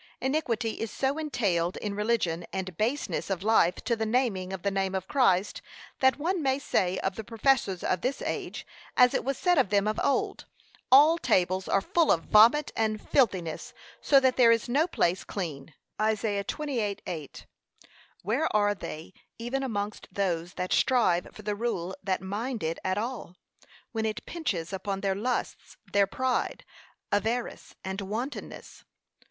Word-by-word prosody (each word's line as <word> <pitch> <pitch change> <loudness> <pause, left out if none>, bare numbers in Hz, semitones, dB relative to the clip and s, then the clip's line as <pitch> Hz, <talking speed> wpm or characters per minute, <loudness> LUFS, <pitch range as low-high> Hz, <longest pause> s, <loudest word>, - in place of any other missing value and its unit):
Iniquity 245 -6 -1
is 225 - -2
so 275 +7 -1
entailed 195 - 0
to 205 -1 -3
religion, 205 -6 0
and 185 -2 -4
baseness 235 - -1
of 190 -1 -2
life 210 -5 +4
to 235 - +1
the 220 - -2
naming 215 -6 0
of 190 -2 -6
the 200 - +1
name 195 -1 -1
of 190 0 -3
Christ, 205 -8 +2 0.4
that 265 0 +4
one 345 +4 -1
may 265 -2 +1
say 185 -9 0
of 190 - -1
the 220 - -4
professors 225 -4 +1
of 185 - 0
this 260 +2 -1
age, - - -4 0.3
as 250 0 +6
it - - 0
was 270 0 -2
said 355 -4 +3
of 250 - +2
them 200 0 +2
of 215 - -1
old, 280 - 0 0.4
'All 300 +5 +7
tables 185 - +1
are 195 - +2
full 330 - +2
of 165 - +2
vomit 235 +8 +5
and 215 -1 0
filthiness, 185 - 0 0.3
so 275 - +5
that 260 -1 +2
there 240 -3 +7
is 230 0 +2
no 285 +7 +2
place 180 - 0
clean.' 160 -7 -5 0.3
(Isa. 215 -2 0
28:8) 205 - -4 0.8
Where 245 - +1
are 205 -1 +3
they 165 -3 -8 0.2
even 240 +4 -2
amongst 210 -5 -3
those 175 -3 -2
that 180 0 -2
strive 225 -9 +3
for 215 - -12
the 210 0 -1
rule, 190 -5 -2
that 190 -1 -1
mind 215 +4 -3
it 160 +1 -2
at 185 +1 0
all, 225 -5 -4 0.6
when 220 -1 -1
it 215 - -4
pinches 200 - -3
upon 195 0 -3
their 195 -1 +1
lusts, 240 +6 -3 0.2
their 200 -1 +4
pride, 255 +5 -1 0.5
avarice, 225 +4 -2
and 190 +1 -3
wantonness? 225 +8 -6
215 Hz, 165 wpm, -28 LUFS, 190-255 Hz, 0.8 s, All